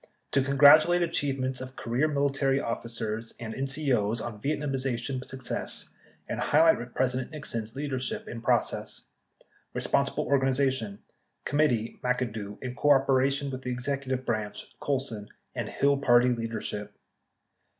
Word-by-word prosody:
— - - -46
To 135 - +3
congratulate 145 +6 +6
achievements 135 -6 -1
of 130 0 -8
career 120 +6 0
military 140 -2 +1
officers 115 -2 -4
and 110 -2 -5
N 135 +3 -2
CO's 125 -6 0
on 110 -2 -6
Yietnamization 135 -2 -2
success 130 -1 -5 0.4
and - - -3
highlight 150 -6 +3
President 130 0 0
Nixon's 115 -7 -5
leadership 135 -3 -2
in 115 - -6
process. - - 0 0.7
Responsible - - 0
organization. 130 -6 +1 0.2
— - - -47
Committee 130 -7 +1
(McAdoo) 115 -5 -2
in 125 -1 -4
coor 140 -1 +4
dination 135 +1 +2
with 130 0 -5
the 125 - -4
Executive 130 +1 -2
Branch 110 -2 -2
(Colson) 130 -7 -2 0.2
and - - -3
Hill 140 0 +2
party 125 -2 +5
leadership. 115 -3 -3
130 Hz, 130 wpm, -28 LUFS, 115-140 Hz, 0.7 s, congratulate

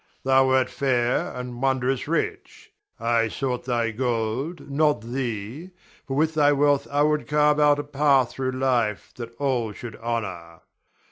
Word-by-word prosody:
Thou 135 0 +4
wert 130 0 +3
fair 125 -3 0
and 125 -1 -6
wondrous 130 -1 0
rich; - - -3 0.3
I 115 0 +2
sought 125 +2 -3
thy 120 -2 0
gold, 120 +6 -2
not 145 -3 +1
thee, 120 - -5 0.4
for 135 - -3
with 160 +1 +2
thy 145 -2 +4
wealth 145 0 +2
I 145 +1 +2
would 150 0 +1
carve 150 0 +3
out 145 -1 +5
a 145 - -3
path 140 -3 +2
through 130 -1 -3
life 125 -5 0
that 115 -1 -8
all 125 -6 -1
should 120 0 -8
honor. 95 -8 -5
130 Hz, 150 wpm, -24 LUFS, 115-145 Hz, 0.4 s, out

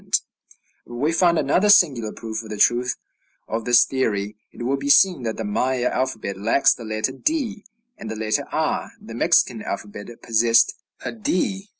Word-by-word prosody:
But 120 - -9
we 145 +6 0
find 170 0 +3
another 180 +8 +2
singular 130 - +4
proof 110 -1 -6
of 110 - -12
the 105 - -5
truth 120 +4 +2 0.5
of 115 0 -4
this 120 -1 +5
theory: 105 -6 -2 0.2
It - - -9
will 130 +3 0
be 140 +1 -4
seen 170 +1 +5
that 115 -2 -4
the 110 - -4
Maya 125 +4 -1
alphabet 110 -7 -3
lacks 120 +7 +3
the 120 - -11
letter 110 +2 -2
d 230 - -2 0.4
and 110 - -7
the 110 - -4
letter 110 0 -1
r. - - -2
The - - -11
Mexican - - +2
alphabet 105 0 -6 0.2
possessed 115 0 +3 0.3
a - - -2
d. 195 -2 -2
120 Hz, 175 wpm, -22 LUFS, 110-155 Hz, 0.5 s, this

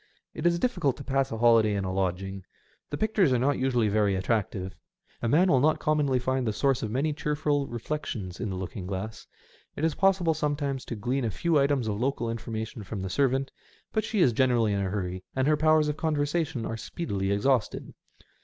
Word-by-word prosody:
It 165 - 0
is 170 0 +3
difficult 175 - 0
to 140 - -8
pass 135 -1 0
a 115 - -3
holiday 115 -2 +4
in 100 -1 -1
a 95 - -2
lodging. 95 0 -2 0.5
The 145 - -3
pictures 205 -7 +2
are - - +3
not 135 +4 +1
usually 125 -4 +2
very 105 -1 +2
attractive. 95 -1 -1
SEASIDE - - -22
EFFECTS. - - -36
211 115 - 0
A 150 - +5
man 180 +1 +4
will 130 - +5
not - - -1
commonly 150 -4 +2
find 130 0 -1
the 110 - 0
source 135 +3 +1
of 110 - -2
many 140 +7 0
cheerful 145 -2 0
reflections 120 -7 -5
in 115 - -2
the 95 - -3
looking 90 0 -5
glass. 100 +3 -5 0.5
It 155 - -1
is 160 - +1
possible 190 -3 +3
sometimes 145 -3 -2
to 120 - -5
glean 125 +5 -1
a - - 0
few 165 - +1
items 140 -4 +1
of 105 +1 -2
local 125 -3 -1
information 110 -1 -5
from 95 0 -5
the 95 - -4
servant, 135 +4 +1 0.4
but 220 - +1
she 210 -1 0
is 125 -8 +4
generally 120 -4 +2
in 100 - 0
a 95 - -1
hurry, 95 -2 -3
and 130 +1 +1
her 155 - +4
powers 155 0 +3
of 150 0 -2
conversation 150 -4 -1
are 115 - -3
speedily 100 - -3
exhausted. 115 +3 0
130 Hz, 215 wpm, -27 LUFS, 105-150 Hz, 0.5 s, A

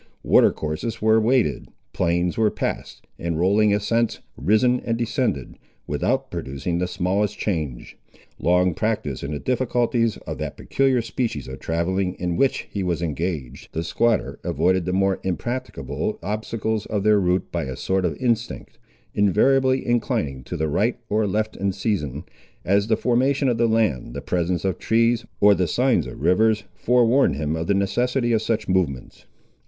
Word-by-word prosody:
Water - - +5
courses 75 +9 -4
were 110 +1 +4
waded, 115 - +1 0.3
plains 85 +1 0
were 110 -1 +3
passed, - - -4
and 85 -1 -2
rolling 100 +4 +3
ascents 115 +3 +1 0.2
risen 110 - +2
and 115 0 -2
descended, 115 - -2 0.3
without - - -1
producing 70 +6 -3
the 90 - 0
smallest 95 +4 -1
change. 75 - -4 0.4
Long 90 +1 +3
practised 105 -10 -2
in 70 - -4
the 75 - -2
difficulties 120 - 0
of - - -5
that - - -5
peculiar 135 -3 +1
species 115 - -3
of 65 0 -8
travelling 90 +3 -1
in 90 -1 -2
which 135 +8 +1
he 100 - -3
was 85 -2 -1
engaged, 80 -5 -4
the 80 - -2
squatter 115 +6 0
avoided 95 -1 +1
the 90 - -1
more 95 +1 +1
impracticable 120 +8 -3
obstacles 110 +1 -2
of 105 -2 -1
their 105 -1 +4
route 90 0 0
by - - -2
a 65 -1 -5
sort 95 0 0
of 80 -5 -1
instinct, 120 -2 -2 0.3
invariably 130 +6 +3
inclining 75 - -1
to - - -5
the 80 - 0
right 105 +10 +1
or 105 0 +1
left 110 +2 -1
in 100 0 -1
season, 75 - -2 0.4
as 100 +2 +2
the 110 - +2
formation 130 +3 +2
of 120 -3 +1
the 115 - +4
land, 105 - 0
the - - -3
presence 90 0 -1
of 95 - -1
trees, 115 0 +2
or 105 0 +7
the 90 -3 0
signs 125 - +2
of - - -9
rivers 110 +3 +3
forewarned 120 - +3
him 75 +2 -2
of 80 +1 -3
the 100 - +2
necessity 120 +5 +1
of 110 -2 +2
such 110 0 -1
movements. 85 -9 -2
100 Hz, 165 wpm, -23 LUFS, 85-115 Hz, 0.4 s, or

